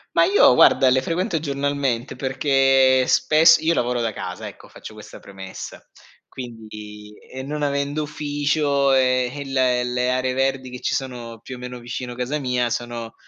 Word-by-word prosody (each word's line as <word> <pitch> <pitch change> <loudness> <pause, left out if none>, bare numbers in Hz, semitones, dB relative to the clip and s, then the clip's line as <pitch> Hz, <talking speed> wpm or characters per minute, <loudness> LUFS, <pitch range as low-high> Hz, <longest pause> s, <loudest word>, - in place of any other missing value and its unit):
Ma 165 - +5
io 195 -9 +5
guarda 130 +1 +5
le 130 +1 +3
frequento 170 +2 -1
giornalmente 140 -4 -2
perché 135 -1 +3
spess 165 +2 +5
io 165 +1 +1
lavoro 120 0 0
da 115 -2 -2
casa - - -6
ecco, - - -13
faccio - - -12
questa - - -12
premessa. 95 -1 -9 0.5
Quindi 105 -4 -10
e 130 0 -9
non 150 +2 -5
avendo 140 +1 -1
ufficio, 145 -1 0
ehm, 130 -1 +2
eh - - -6 0.4
il 125 0 -3
le 125 0 0
aree 130 0 0
verdi 135 -1 -1
che 125 - -8
ci - - -1
sono 120 -4 -6
più 130 - -8
o - - -11
meno 125 0 -7
vicino 120 +1 -6
casa 125 +5 -3
mia 125 -3 -1
sono 120 -1 -5
130 Hz, 165 wpm, -22 LUFS, 125-140 Hz, 0.5 s, Ma